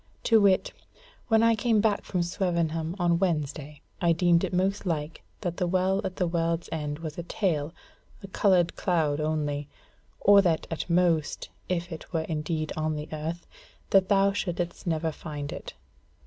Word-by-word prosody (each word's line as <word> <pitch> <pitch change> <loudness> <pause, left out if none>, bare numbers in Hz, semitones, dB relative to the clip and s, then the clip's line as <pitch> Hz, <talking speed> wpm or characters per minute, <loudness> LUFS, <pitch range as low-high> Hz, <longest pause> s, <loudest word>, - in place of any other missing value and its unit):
To 225 -2 +5
wit, 195 -2 +3 0.5
when 225 -1 +4
I 230 0 +5
came 225 0 +2
back 210 -1 +1
from 180 -2 -1
Swevenham 170 -2 -1
on 170 -2 +2
Wednesday 150 -5 -2 0.2
I 170 -1 +4
deemed 170 0 +3
it - - -1
most 190 +2 0
like 155 -1 -3 0.2
that 175 -4 -3
the 180 - 0
Well 185 +2 +1
at 185 -1 -4
the 180 - 0
World's 165 0 -1
End 150 -2 -3
was 160 0 -6
a - - -1
tale, 165 -4 -1 0.5
a - - -6
coloured 185 -3 +2
cloud 155 -5 +1
only; 150 -2 -2 0.5
or 200 0 +7
that 170 -4 +1
at 165 - -4
most 170 -3 +1 0.2
if 175 -1 -2
it 160 - -8
were 165 -3 0
indeed 155 0 -3
on 155 0 -1
the 150 +1 -6
earth, 160 +3 -4 0.5
that 190 -1 +4
thou 195 0 +4
shouldest 175 -3 -3
never 160 -1 0
find 145 -2 -6
it. - - -8
170 Hz, 170 wpm, -27 LUFS, 155-185 Hz, 0.5 s, or